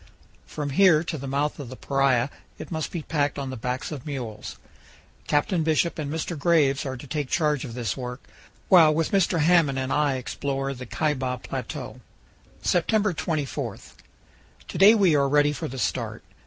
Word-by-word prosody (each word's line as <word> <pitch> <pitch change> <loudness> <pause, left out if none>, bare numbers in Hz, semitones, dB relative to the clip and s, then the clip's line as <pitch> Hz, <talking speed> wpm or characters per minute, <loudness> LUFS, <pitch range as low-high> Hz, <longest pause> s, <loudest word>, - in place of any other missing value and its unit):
From 145 -2 -4
here 165 0 +5
to 165 - -4
the 135 - -6
mouth 145 +3 -1
of 135 -5 -7
the 130 - -8
Paria 135 0 +1 0.3
it - - -9
must 160 -2 -2
be 170 -3 -4
packed 145 -2 -1
on 135 -2 -4
the - - -5
backs 125 +4 -4
of 140 -5 -6
mules; 120 -7 -6 0.7
Captain 155 +4 +1
Bishop 160 +1 +1
and 145 -2 -3
Mr. 160 +2 -3
Graves 145 -3 +2
are 130 0 -4
to 120 - -10
take 145 -1 -3
charge 150 -5 +1
of 120 -3 -8
this 115 -6 -2
work, 125 0 -6 0.5
while 165 -5 +7
with 155 +1 0
Mr. 185 -4 +2
Hamblin 145 -5 +3
I 145 -2 +2
explore 135 +1 -3
the 125 -1 -9
Kaibab 130 -4 -1
Plateau. 130 0 -6 0.6
September 205 +3 +2
24 155 -4 -3 0.9
To - - -5
day 205 +4 +8
we 190 -7 +4
are 140 -1 +2
ready 145 +1 +3
for 145 - -4
the 135 - -7
start. - - -2
145 Hz, 175 wpm, -25 LUFS, 130-160 Hz, 0.9 s, day